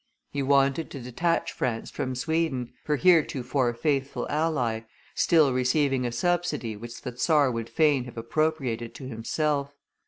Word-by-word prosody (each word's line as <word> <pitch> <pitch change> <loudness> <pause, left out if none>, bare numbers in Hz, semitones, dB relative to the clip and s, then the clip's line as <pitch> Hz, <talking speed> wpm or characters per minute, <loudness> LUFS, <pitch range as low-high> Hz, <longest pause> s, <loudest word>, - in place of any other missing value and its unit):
He 140 - -2
wanted 140 +3 +2
to 140 - -7
detach 145 +8 -1
France 115 -3 -3
from 130 0 -3
Sweden, 135 -2 -1
her 150 - +1
heretofore 135 -7 +3
faithful 140 +1 -1
ally, 145 -8 0 0.3
still 155 -6 +4
receiving 130 0 +1
a - - -3
subsidy 155 -5 -1
which 115 +5 -9
the 125 -3 -5
czar 145 0 +3
would 115 -1 -4
fain 150 -6 +2
have 125 - -11
appropriated 120 -2 -1
to 130 - -8
himself. 140 +4 -1
135 Hz, 145 wpm, -27 LUFS, 120-155 Hz, 0.3 s, still